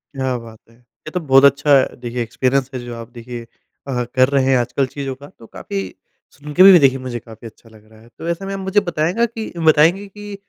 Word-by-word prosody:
क्या 130 -2 -2
बात 115 -2 -12
है! 115 - -22
ये 125 +5 -15
तो 180 - -2
बहुत 135 -3 +4
अच्छा 140 0 +4 0.2
देखिए 120 0 -4
एक्सपीरियंस 130 +3 -1
है 130 - -4
जो 120 -1 -7
आप 115 0 -9
देखिए 120 0 -8
अ, 125 +2 -7
कर 130 +1 +4
रहे 140 -2 +2
हैं 135 -1 +3
आजकल 125 +3 0
चीज़ों 135 0 -6
का, 140 +2 -13
तो 115 - -17
काफ़ी 95 -2 -6 0.4
सुन 150 +1 -10
के 185 - +6
भी 190 -3 +9
देखिए 135 -1 +3
मुझे 125 -2 -5
काफ़ी 115 0 -12
अच्छा 115 +1 -18
लग 110 -1 -19
रहा 110 - -18
है, 115 - -19
तो 165 - -7
ऐसे 175 +3 -3
में 195 - -5
आप 195 - -5
मुझे 190 +2 +1
बताएगा 175 +5 0
कि 225 -1 -7
बताएँगे 165 +5 +3
कि 205 +1 -10
135 Hz, 235 wpm, -19 LUFS, 120-165 Hz, 0.4 s, भी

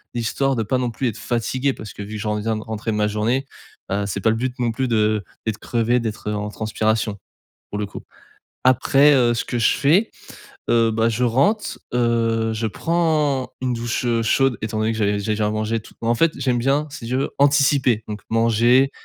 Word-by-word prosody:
histoire 130 +4 0
de 115 - 0
pas 125 +5 0
non 125 -1 -1
plus 120 +3 -2
être 110 - -7
fatigué. 130 +3 -1
Parce 110 -4 -9
que - - -9
vu 105 +2 -6
que - - -3
j'en 105 0 -2
viens 110 +1 -1
de 110 - -6
rentrer 110 0 -5
de - - -1
ma 105 0 +2
journée, 110 +6 0 0.5
heu, 100 +1 0
c'est 100 0 -3
pas 110 - +3
le 115 - 0
but 125 +2 -3
non 120 -2 0
plus 130 +3 -1
de 110 -2 +1 0.2
d'être 110 -2 -2
crevé, 120 +1 +1
d'être, 110 -2 -4
heu, - - -1
en 105 0 -3
transpiration 110 -1 -1 0.5
pour 105 - -4
le 105 - -2
coup. - - -9 0.6
Après, 135 +3 +5
heu, 120 -3 +4
ce 115 - -1
que 120 - -3
je 115 - +3
fais, 165 +10 +3 0.6
heu, 115 -1 +3
bah, 115 +1 +1
je 115 +2 0
rentre, 140 - +1 0.2
heu, 115 -2 +1
je 110 +1 -2
prends 150 -2 0
une 130 -1 0
douche, 120 +1 -2
heu, 115 -1 +1
chaude 135 +2 +2
étant 110 0 -3
donné 110 +1 +1
que 110 - -5
j'avais 105 -1 +1
j'ai 100 +2 -2
déjà 105 0 0
mangé 110 +1 -1
et 115 - -2
tout. - - -16
Moi 115 - +1
en - - +4
fait, 165 +6 +3
j'aime 125 -2 +1
bien 135 +5 +1
si 135 -5 -8
tu 125 +2 -1
veux 135 - -1
anticiper, 140 -5 +3
donc 105 0 -6
manger, 115 +4 +3
115 Hz, 225 wpm, -21 LUFS, 110-130 Hz, 0.6 s, Après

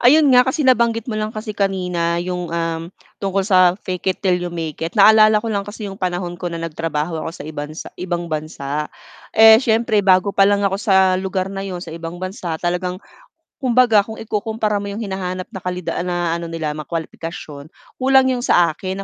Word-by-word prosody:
Ayun 285 +3 +6
nga, 250 +1 +6
kasi 275 +3 0
nabanggit 235 -2 +2
mo - - -3
lang 215 - -1
kasi 215 0 -5
kanina 180 -4 -1
yung, 180 -1 -3
um, 165 0 -3 0.3
tungkol 195 0 0
sa, 185 -2 +4
"Fake 185 0 -4
it, - - -41
till 180 -2 +2
you 175 - -3
make 165 -3 -5
it." 165 +6 -4
naalala 215 +1 +6
ko 225 - -2
lang 200 0 -2
kasi 205 -1 -6
yung 195 - -11
panahon 175 -1 -3
ko 180 - -3
na 170 - -5
nagtrabaho 165 -1 -3
ako 165 +2 -6
sa - - -9
ibansa 150 0 -7
ibang 175 -2 -3
bansa. 150 -1 -3 0.5
Eh, 220 0 +9
siyempre 225 -2 +2
bago 190 0 +3
pa 195 0 +4
lang 205 0 +2
ako 195 0 0
sa 190 -2 +3
lugar 190 0 -2
na 195 0 -5
'yon- 180 -1 -5
sa - - -9
ibang 165 +1 -7
bansa- 185 -2 -5
talagang 180 +1 -1 0.7
kumbaga 245 -4 +4
kung 220 +1 -8
ikukumpara 215 -1 -2
mo 200 - -5
'yong 210 - -5
hinahanap 185 -2 -4
na 190 - -6
kalida 180 -1 -3
na 175 -2 -1
ano 170 0 -6
nila 160 -2 -2
mga 150 - -8
kwalipikasyon, 160 -3 -6 0.3
kulang 265 0 +5
'yong 250 - -2
sa 170 -8 +4
akin 190 +1 -5
185 Hz, 200 wpm, -19 LUFS, 170-210 Hz, 0.7 s, Eh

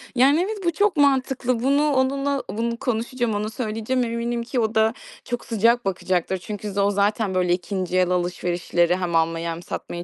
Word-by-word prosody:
Yani, 270 +5 +5
evet, 430 0 -4
bu 340 - +3
çok 405 -1 +1
mantıklı. 265 -3 +2
Bunu 285 +3 +3
onunla 275 +1 0
bunu 235 +2 -2
konuşacağım, 240 0 -1
ona 210 +1 -2
söyleyeceğim. 225 +2 -2
Eminim 235 0 -2
ki 245 +1 -2
o 220 -1 0
da 220 0 +3 0.3
çok 240 -1 -4
sıcak 230 0 +2
bakacaktır. 185 -1 -1
Çünkü 205 +2 -6
z 195 - -9
o 200 0 +3
zaten, 205 0 0
böyle, 180 -1 +2
2'nci 185 0 -2
el 180 -1 +3
alışverişleri 175 -1 0
hem 180 -2 -2
almayı 165 +1 +1
hem 165 +1 -4
satmayı 175 0 -6
220 Hz, 180 wpm, -23 LUFS, 185-255 Hz, 0.3 s, Yani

